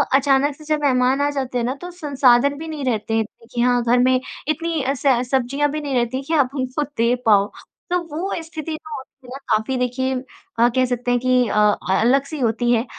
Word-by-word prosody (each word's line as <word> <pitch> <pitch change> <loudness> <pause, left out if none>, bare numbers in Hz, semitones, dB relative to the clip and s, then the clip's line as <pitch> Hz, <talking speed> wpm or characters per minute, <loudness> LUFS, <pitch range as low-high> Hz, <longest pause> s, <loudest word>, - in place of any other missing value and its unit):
अचानक 275 +1 +3
से 305 - -15
जब 300 - -1
मेहमान 260 0 +2
आ 285 - +2
जाते 255 -1 -3
हैं 235 - 0
ना 255 +2 -2
तो 355 - -7
संसाधन 280 -4 +2
भी 320 +2 -7
नहीं 305 -3 -5
रहते 225 -3 -1
हैं 220 - +1 0.3
कि 240 - 0
हाँ 245 0 +3
घर 240 +1 +3
में 255 +1 +3 0.3
इतनी 320 0 -1
स 270 -2 +2
सब्ज़ियाँ 270 +3 +1
भी 305 +1 -3
नहीं 280 -2 -3
रहती 245 +2 0
कि 330 - -2
आप 280 -3 +2
उनको 260 +2 -2
दे 235 +2 +3
पाओ। 205 -2 +4 0.4
तो 360 - +3
वो 335 +6 -3
स्थिति 320 -1 -6
जो 310 -1 -7
होती 260 -1 -12
है 270 - -6
काफ़ी 220 +4 +1
देखिए 250 +1 -1 0.5
अ, 235 - +6
कह 255 0 +3
सकते 245 0 -2
हैं 245 - +2
कि 250 0 +2
अ - - -2
अ, 210 -2 +2
अलग-सी 275 +6 +1
होती 240 0 +1
है 235 0 +2
260 Hz, 215 wpm, -21 LUFS, 245-290 Hz, 0.5 s, अ